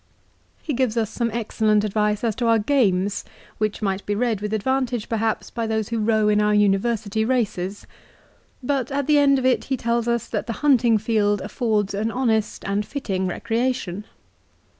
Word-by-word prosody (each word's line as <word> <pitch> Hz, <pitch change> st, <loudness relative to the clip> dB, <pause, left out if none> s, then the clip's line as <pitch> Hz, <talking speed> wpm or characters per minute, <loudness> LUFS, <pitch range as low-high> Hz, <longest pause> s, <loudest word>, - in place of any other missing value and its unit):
1 -, -, -35 dB
He 300 Hz, -, -2 dB
gives 245 Hz, -3 st, 0 dB
us 220 Hz, -2 st, 0 dB
some 235 Hz, -1 st, -1 dB
excellent 215 Hz, -2 st, +1 dB
advice 210 Hz, 0 st, 0 dB
as 230 Hz, -2 st, +1 dB
to 240 Hz, -, -1 dB
our 230 Hz, 0 st, +5 dB
games, 205 Hz, -5 st, +1 dB, 0.4 s
which 215 Hz, 0 st, -1 dB
might 195 Hz, -1 st, -1 dB
be 205 Hz, -, 0 dB
read 225 Hz, -2 st, 0 dB
with 210 Hz, 0 st, -3 dB
advantage, 245 Hz, +1 st, -1 dB
perhaps, 225 Hz, -1 st, -1 dB
by 230 Hz, -1 st, -3 dB
those 220 Hz, -1 st, -1 dB
who 230 Hz, -1 st, -1 dB
row 215 Hz, 0 st, +2 dB
in 210 Hz, 0 st, +3 dB
our 210 Hz, 0 st, +2 dB
university 210 Hz, +1 st, +1 dB
races. 205 Hz, -5 st, -1 dB, 0.8 s
But 265 Hz, -1 st, -1 dB
at 280 Hz, 0 st, -1 dB
the 300 Hz, 0 st, +4 dB
end 280 Hz, -1 st, +4 dB
of 260 Hz, -, -2 dB
it 260 Hz, -1 st, +2 dB
he 265 Hz, -, -1 dB
tells 235 Hz, 0 st, -1 dB
us 235 Hz, 0 st, 0 dB
that -, -, -3 dB
the 230 Hz, -, -2 dB
hunting 240 Hz, -5 st, +4 dB
field 210 Hz, -1 st, +1 dB
affords 210 Hz, -1 st, -1 dB
an 210 Hz, +3 st, -1 dB
honest 225 Hz, -3 st, -1 dB
and 200 Hz, +1 st, 0 dB
fitting 195 Hz, -7 st, -3 dB
recreation. 225 Hz, -1 st, -2 dB
220 Hz, 180 wpm, -23 LUFS, 210-240 Hz, 0.8 s, our